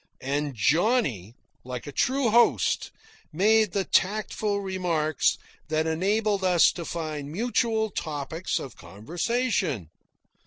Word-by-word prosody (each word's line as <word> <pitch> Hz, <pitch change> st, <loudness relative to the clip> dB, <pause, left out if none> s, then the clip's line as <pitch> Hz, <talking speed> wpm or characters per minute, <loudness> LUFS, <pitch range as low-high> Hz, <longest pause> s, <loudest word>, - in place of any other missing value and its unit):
And 140 Hz, +1 st, -2 dB
Johnny, 135 Hz, -, +1 dB, 0.3 s
like 125 Hz, -2 st, -6 dB
a 145 Hz, -, -7 dB
true 260 Hz, -, +1 dB
host, 235 Hz, +2 st, +3 dB, 0.4 s
made 215 Hz, +4 st, +3 dB
the 195 Hz, -, +1 dB
tactful 205 Hz, +1 st, 0 dB
remarks 175 Hz, -6 st, 0 dB, 0.3 s
that 155 Hz, 0 st, 0 dB
enabled 200 Hz, +5 st, 0 dB
us 180 Hz, -2 st, +5 dB
to 170 Hz, -, -7 dB
find 155 Hz, -4 st, -5 dB
mutual 220 Hz, +2 st, 0 dB
topics 155 Hz, +1 st, -3 dB
of 130 Hz, -, -7 dB
conversation. 155 Hz, -, -2 dB
175 Hz, 110 wpm, -26 LUFS, 145-215 Hz, 0.4 s, us